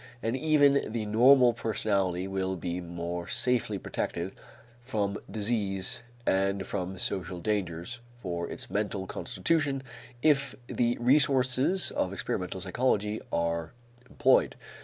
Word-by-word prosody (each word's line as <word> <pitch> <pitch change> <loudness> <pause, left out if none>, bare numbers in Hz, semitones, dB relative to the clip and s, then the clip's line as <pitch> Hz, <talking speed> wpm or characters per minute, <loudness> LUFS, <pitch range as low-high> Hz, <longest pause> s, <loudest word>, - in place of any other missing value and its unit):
And 115 +2 0
even 145 -3 +3
the 110 -1 -2
normal 120 +3 +6
personality 100 -5 0
will 95 -1 -2
be 90 0 -4
more 85 0 -5
safely 120 -5 +1
protected 85 0 -3 0.5
from 105 -5 -2
disease 105 +1 -1 0.2
and 95 0 +1
from 95 -1 -4
social 90 -1 -1
dangers 100 +2 -2 0.2
for 85 -6 -4
its - - -6
mental 100 -2 -1
constitution 145 - 0 0.4
if 140 -4 +3
the 120 0 0
resources 135 +5 +3
of 95 - -1
experimental 95 -1 -3
psychology 105 +1 0
are 85 +1 -1 0.4
employed. - - +3
105 Hz, 115 wpm, -29 LUFS, 95-125 Hz, 0.5 s, normal